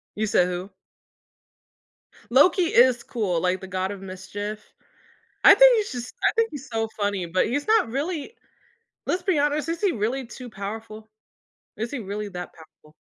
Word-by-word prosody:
You 215 +1 -1
said 180 -3 +3
who? 180 +2 -5 1.6
Loki 290 +9 +5
is 250 -6 +4
cool, 195 -8 -2
like 180 +1 0
the 190 - -8
god 185 0 -2
of 200 -1 -7
mischief. 205 +3 -7 0.7
I - - +10
think - - +7
he's 425 -2 -1
just 245 -1 -6
I - - +4
think 455 0 +2
he's 290 0 -8
so 225 0 -1
funny 205 -3 -1
but 170 +2 +1
he's 285 +4 -2
not 440 - +3
really 300 - -4 0.7
let's 360 0 -1
be 365 -3 +1
honest 295 +1 0
is 330 0 -3
he 400 -3 +3
really 245 +3 -2
too 245 +1 -10
powerful? 215 +1 -8 0.7
Is 225 +2 -4
he 285 - -4
really 210 -1 -5
that 180 -1 -7
powerful? 155 -1 -19
225 Hz, 170 wpm, -24 LUFS, 195-290 Hz, 1.6 s, I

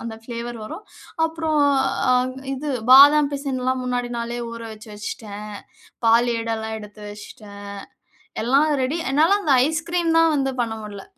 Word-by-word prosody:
அந்த 225 -1 -5
பிளேவர் 235 -1 -6
வரும். 410 - -8 0.4
அப்புறம் 320 -2 -1 0.5
அ - - +5 0.4
இது 295 +3 -5 0.2
பாதாம் 285 +2 +8
பிசன்லாம் 260 -2 -2
முன்னாடி 245 -1 -2
நாளே 235 +1 -4
ஊறவச்சு 225 -2 -9
வச்சுட்டேன். 205 0 -7 0.7
பால் 230 +2 +5
ஏடு 230 0 -3
எல்லாம் 220 0 -5
எடுத்து 210 0 -12
வச்சுட்டேன். 205 -1 -11 0.8
எல்லாம் 275 +6 +3 0.2
ரெடி 290 +6 -1
என்னால 330 +8 +4
அந்த 300 -7 +1
ஐஸ் 320 +1 -2
கிரீம் 340 -2 +1
தான் 330 -1 +4
வந்து 270 -2 0
பண்ண 230 -2 -1
முடியல. 200 -2 -8
250 Hz, 145 wpm, -22 LUFS, 225-300 Hz, 0.8 s, பாதாம்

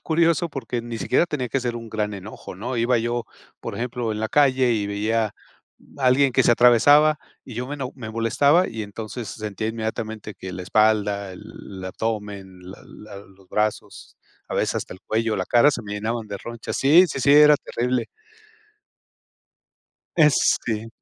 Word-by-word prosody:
curioso 170 0 +1
porque 125 -5 -4
ni 115 -1 -6
siquiera 130 +9 +2
tenía 140 -6 -3
que 135 - 0
ser 120 -1 -2
un 115 -1 -7
gran 105 -1 -2
enojo, 100 +1 -9
¿no?, 120 +7 -5
iba 120 +2 +2
yo, 120 0 -2 0.3
por - - -6
ejemplo, 120 -2 -3
en 105 - -4
la 110 - -1
calle 130 -3 +3
y 105 -3 -1
veía 105 +1 -1 0.6
alguien 135 +1 +4
que 135 0 +3
se - - +5
atravesaba 145 +6 +5 0.3
y 125 - -10
yo 125 +2 -4
me 145 - -5
eno 130 -3 -5
me 120 -4 -7
molestaba, 140 - +2
y 110 -1 -5
entonces, 110 +3 -7
sentía 105 0 -5
inmediatamente 110 -1 -5
que 95 0 -8
la 90 0 -6
espalda, 105 -1 +1
el 95 +1 -11
abdomen, 100 -2 -5
la 95 - -11
la 105 -1 -12
los 95 -1 -18
brazos, 105 0 -3 0.3
a - - -4
veces - - 0
hasta - - -5
el 95 - -16
cuello, 110 0 -1
la 95 - -2
cara 120 +5 +5
se 120 - -4
me 105 -1 -6
llenaban 110 +1 -3
de 100 - -4
ronchas. 120 +1 -6
Sí, 165 +7 +6
sí, 140 - -4
sí, 140 - +4
era 150 0 +8
terrible. 125 -1 -2 2.1
Este 120 -7 +2
115 Hz, 175 wpm, -23 LUFS, 105-130 Hz, 2.1 s, era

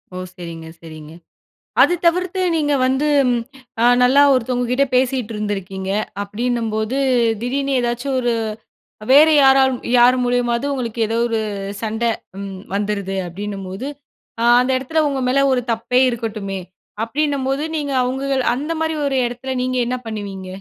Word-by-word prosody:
ஓ! - - -5 0.2
சரிங்க, 165 -2 -8
சரிங்க. 155 -2 -11 0.7
அது 355 - +5
தவிர்த்து 365 +2 +1
நீங்க 295 -2 +1
வந்து 265 +3 +1 0.7
ஆ - - +4 0.2
நல்லா 260 +3 +5
ஒருத்தவங்கக்கிட்ட 250 +1 +1
பேசிட்டு 250 -3 0
இருந்துருக்கீங்க. 195 -2 -4 0.3
அப்படின்னும்போது, 225 +2 -2 0.4
திடீர்னு 275 +3 -1
ஏதாச்சும் 240 +3 -2
ஒரு 240 -1 0 0.8
வேற 290 +3 +8 0.2
யாராலும், 265 -1 +4 0.2
யார் 245 +1 +6
மூலியமாவது 245 +1 0
உங்களுக்கு 235 -3 -4
ஏதோ 225 +1 -1
ஒரு 225 -1 -1 0.4
சண்டை 225 +1 -1 0.3
ம் 195 -1 -7
வந்துருது. 200 -1 -2
அப்படின்னும்போது, 195 +5 -6 0.5
ஆ - - +1 0.2
அந்த 255 - 0
இடத்தில 310 +5 0
உங்க 275 -2 -2
மேல 275 +2 +3
ஒரு 250 -1 0
தப்பே 235 +3 +1
இருக்கட்டுமே, 215 -5 -4 0.4
அப்படின்னும்போது 275 +2 -1
நீங்க 285 -2 -3
அவுங்கள 265 +1 -1
அந்தமாரி 320 +3 -2
ஒரு 270 -1 0
இடத்தில 245 +2 -6
நீங்க 255 0 -1
என்ன 255 +1 -1
பண்ணுவீங்க? 200 -4 -6
245 Hz, 130 wpm, -19 LUFS, 210-270 Hz, 0.8 s, வேற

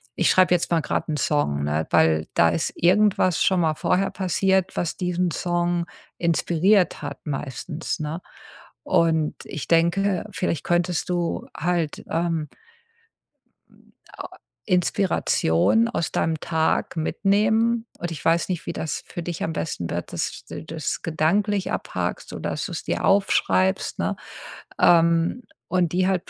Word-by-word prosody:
ich - - +2
schreibe 185 -1 +5
jetzt 175 - +1
mal 165 -1 +3
grad - - -2
'n 155 - -1
Song, 75 - 0
ne, 75 +2 -1
weil 80 -1 +3
da 85 - +5
ist 80 0 -1
irgendwas 185 -1 +3
schon 185 -2 +3
mal 160 -2 +1
vorher 190 +4 +1
passiert, 190 0 +1
was 170 - -2
diesen 180 -1 0
Song 175 0 0 0.3
inspiriert 175 +3 +2
hat 145 -1 -7
meistens, 150 +3 -4
ne?“ 155 +3 -4 0.6
Und 160 -2 +2
ich 150 - -6
denke, 175 +3 +2
vielleicht 170 -3 -2
könntest 175 0 0
du 175 -1 -2
halt, 170 -3 -1
ähm 165 -2 -1 1.7
äh, - - -4 0.4
inspiration 185 - +2
aus 170 -8 -2
deinem 160 -1 0
Tag 160 +1 0
mitnehmen 215 +7 +1
und 175 0 -4
ich 150 - -8
weiß 165 +1 +2
nicht, 180 -3 -3
wie - - -2
das 160 - -4
für 175 - -6
dich 170 0 -5
am 160 - -1
besten 90 - -3
wird, 85 0 -4
dass - - -4
du - - -7
das 160 -2 -4
gedanklich 195 +6 0
abhackst - - -4
oder - - -4
dass - - -3
du - - -7
es - - -5
dir - - -2
aufschreibst, 95 - +2
ne, - - 0 0.7
ähm, 170 +5 +4 0.3
und 180 -2 +1
die 185 +1 +2
halt 185 -2 0
170 Hz, 145 wpm, -23 LUFS, 155-185 Hz, 1.7 s, schreibe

